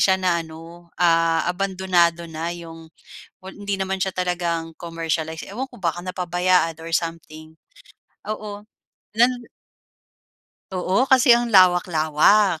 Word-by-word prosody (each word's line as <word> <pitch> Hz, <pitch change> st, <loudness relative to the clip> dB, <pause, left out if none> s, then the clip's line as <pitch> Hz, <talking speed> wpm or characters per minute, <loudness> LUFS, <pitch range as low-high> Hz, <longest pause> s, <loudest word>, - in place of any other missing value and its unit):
siya 190 Hz, -1 st, +4 dB
na 175 Hz, -2 st, +1 dB
ano 165 Hz, +2 st, -13 dB
ah, 165 Hz, -1 st, +3 dB
abandonado 180 Hz, -3 st, +1 dB
na 160 Hz, +2 st, -4 dB
yung, 165 Hz, -1 st, -11 dB, 0.6 s
well, 190 Hz, -, -8 dB
hindi 200 Hz, -1 st, -3 dB
naman 190 Hz, 0 st, -2 dB
siya 190 Hz, 0 st, 0 dB
talagang 170 Hz, -2 st, -2 dB
commercialize, 160 Hz, -1 st, -4 dB
ewan 250 Hz, +7 st, -5 dB
ko 245 Hz, -, -15 dB
baka 170 Hz, +1 st, -1 dB
napabayaan 180 Hz, -2 st, 0 dB
or 165 Hz, 0 st, -8 dB
something. 160 Hz, -1 st, -5 dB, 0.7 s
Oo 210 Hz, -1 st, -6 dB, 0.5 s
nan. 245 Hz, +1 st, +2 dB, 1.3 s
Oo 190 Hz, +8 st, 0 dB
kasi 255 Hz, -1 st, +6 dB
ang 240 Hz, 0 st, +2 dB
lawak-lawak. 180 Hz, -1 st, +4 dB
175 Hz, 120 wpm, -22 LUFS, 165-195 Hz, 1.3 s, kasi